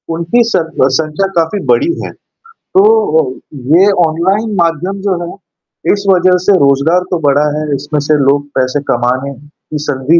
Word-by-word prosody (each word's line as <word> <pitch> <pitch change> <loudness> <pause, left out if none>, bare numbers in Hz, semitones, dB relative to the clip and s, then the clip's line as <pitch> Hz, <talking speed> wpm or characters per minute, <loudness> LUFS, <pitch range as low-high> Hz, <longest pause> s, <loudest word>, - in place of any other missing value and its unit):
उनकी 170 +9 +1
सर 165 -4 -1 0.3
संख्या 160 +5 -1
काफ़ी 170 +4 0
बड़ी 125 - +2
है। - - -6 0.4
तो 195 - 0 0.5
अ, - - -15 0.4
ये 195 +4 +5 0.2
ऑनलाइन 190 +7 -1
माध्यम 175 +4 -2
जो 190 - +1
है। 170 - -8 0.6
इस 200 0 -4
वजह 180 0 +3
से 205 - +4
रोज़गार 140 +5 +2
तो 175 - 0
बढ़ा 145 +2 +3
है, 150 -1 -3
इसमें 145 +2 -3
से 145 +1 +1
लोग 145 +1 +1
पैसे 130 +2 0
कमाने 125 +3 -1 0.4
की 150 +1 +1
160 Hz, 155 wpm, -12 LUFS, 140-185 Hz, 0.6 s, ये